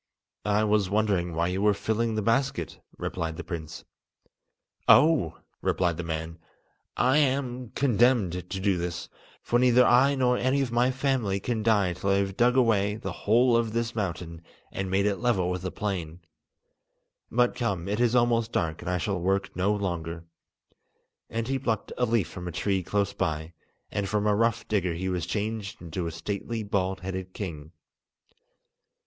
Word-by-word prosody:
"I 105 +1 +3
was 105 -3 +2
wondering 100 -5 +1
why 85 +2 +1
you 95 +2 -2
were 105 0 +4
filling 110 +2 -1
the 110 - -1
basket," 115 - 0 0.2
replied 80 -1 -3
the - - -5
prince. 80 -3 -7 1.0
"Oh!" 150 - +5 0.2
replied 85 -3 +1
the 90 - -3
man, 80 0 -4 0.6
"I 130 +4 +4
am 130 -4 0
condemned 120 -6 +3
to 90 +2 -5
do 95 -2 +1
this, 85 -1 -4 0.3
for 120 - +2
neither 125 0 +5
I 135 +4 +5
nor 125 -2 +2
any 130 +2 +2
of 130 -3 -2
my 120 +2 +3
family 130 -7 0
can 115 +1 -2
die 105 -5 +2
till 95 +3 -3
I 100 - +4
have 100 -1 0
dug 125 +3 +3
away 105 -5 +3
the 100 -3 -5
whole 120 +6 +3
of 115 -2 +1
this 115 0 -1
mountain 85 -5 -4 0.3
and 95 -1 -3
made 95 +1 +2
it 100 -1 +1
level 100 -7 +1
with 90 0 -3
the 90 -1 -4
plain. 90 -5 -4 1.1
But, 120 +1 +2
come, 95 -7 -2
it 105 +2 -1
is 120 0 +3
almost 120 -1 +2
dark, 80 -2 -1
and 85 - -4
I 90 - +1
shall 95 +1 -1
work 95 +3 -1
no 95 +3 +1
longer." 85 -5 -3 1.0
And 115 0 -3
he 135 0 0
plucked 110 -5 -2
a 125 - +1
leaf 110 -7 +1
from 90 -1 -8
a - - -3
tree 95 +3 0
close 100 +2 -1
by, 80 +1 -2 0.4
and 100 -1 -2
from 105 0 0
a 105 - +3
rough 115 +1 +1
digger 90 -5 0
he 95 +2 -2
was 90 -2 -2
changed 105 +1 -3
into 85 0 -4
a - - -3
stately 105 +6 -4
bald 95 -2 -1
headed 95 0 -5
king. 80 -6 -6
100 Hz, 175 wpm, -27 LUFS, 90-115 Hz, 1.1 s, Oh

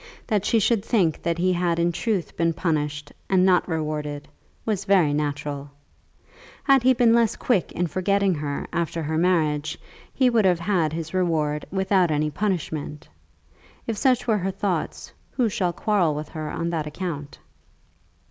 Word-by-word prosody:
That 210 -3 0
she 230 - +3
should 220 0 +2
think 185 -10 +1
that 170 0 -1
he 185 +1 +2
had 175 -1 0
in 170 0 +2
truth 200 0 -2
been 165 0 +1
punished 150 -3 -2 0.2
and 185 -1 +4
not 185 -2 +3
rewarded, 150 -3 -3 0.4
was 210 -3 -1
very 185 -7 +4
natural. 145 -1 -3 0.9
Had 275 -2 +5
he 260 +2 +5
been 235 -1 +4
less 230 -2 +3
quick 210 -8 0
in 175 - 0
forgetting 195 +2 +1
her 145 -2 -3
after 165 -1 -2
her 155 +1 -2
marriage, 155 -4 +1 0.3
he 260 - +2
would 235 -3 +3
have 180 -3 +3
had 175 -7 +1
his 160 0 -5
reward 155 -5 0
without 190 -2 +2
any 150 0 0
punishment. 155 -5 -3 0.8
If 230 - -2
such 250 +3 +2
were 220 -3 +2
her 190 +1 -1
thoughts, 185 -4 -3 0.2
who 245 -4 +1
shall 185 -3 0
quarrel 175 -5 +1
with 150 0 -5
her 155 -2 -5
on 170 0 -3
that 160 -3 -2
account? 150 -3 -5
170 Hz, 165 wpm, -24 LUFS, 150-200 Hz, 0.9 s, Had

